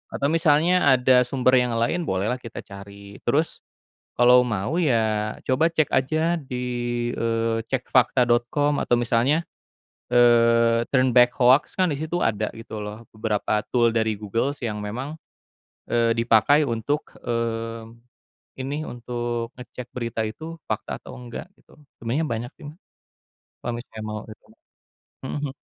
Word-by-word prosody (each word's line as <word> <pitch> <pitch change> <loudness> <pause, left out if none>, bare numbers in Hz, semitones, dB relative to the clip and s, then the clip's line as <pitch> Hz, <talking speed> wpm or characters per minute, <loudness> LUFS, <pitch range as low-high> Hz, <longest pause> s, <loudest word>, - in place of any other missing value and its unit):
Atau 140 - 0
misalnya 165 -1 +4
ada 125 0 +4
sumber 130 0 +3
yang 125 -1 0
lain 120 +10 0
bolehlah 100 +7 0
kita 115 -2 -8
cari, 100 0 -12
terus 150 +7 0 0.6
kalau 125 +1 +6
mau 110 +6 -2
ya 110 -8 +1
coba 135 +6 +2
cek 155 -3 +2
aja 155 +6 +1
di, 125 -4 -5 0.5
eee, 115 0 0
cekfakta.com 125 +2 +2
atau - - 0
misalnya, 120 +6 +2 0.7
eee, 115 -1 +5
Turn 130 -2 +3
Back 125 0 +7
Hoax 125 +3 +4
kan 185 - +4
di - - -2
situ 160 +3 -2
ada 110 -5 0
gitu 110 -1 -7
loh 105 +2 -8
beberapa 105 -1 0
tool 120 -2 +3
dari 110 -1 0
Google 110 +6 -1
yang 105 -2 -3
memang, 130 +9 -5 0.7
eee, 115 -1 +2
dipakai 115 +6 +4
untuk, 135 +5 -2
mmm, 115 -1 -3 0.6
ini 145 +4 -3
untuk 120 -1 -4
ngecek 125 -1 -9
berita 115 -2 -3
itu 160 +9 -8
fakta - - -4
atau - - -11
enggak, 120 +4 -8
gitu. - - -23 0.2
Sebenernya 130 +8 -2
banyak 120 +1 -4
sih, 150 - -9 1.0
kalo 120 - -1
misalnya 110 -2 -10
mau 105 0 -4
gitu. 110 - -13 0.8
Mhm, 135 - -4
mmm. 135 - -8
120 Hz, 140 wpm, -24 LUFS, 115-135 Hz, 1.0 s, Back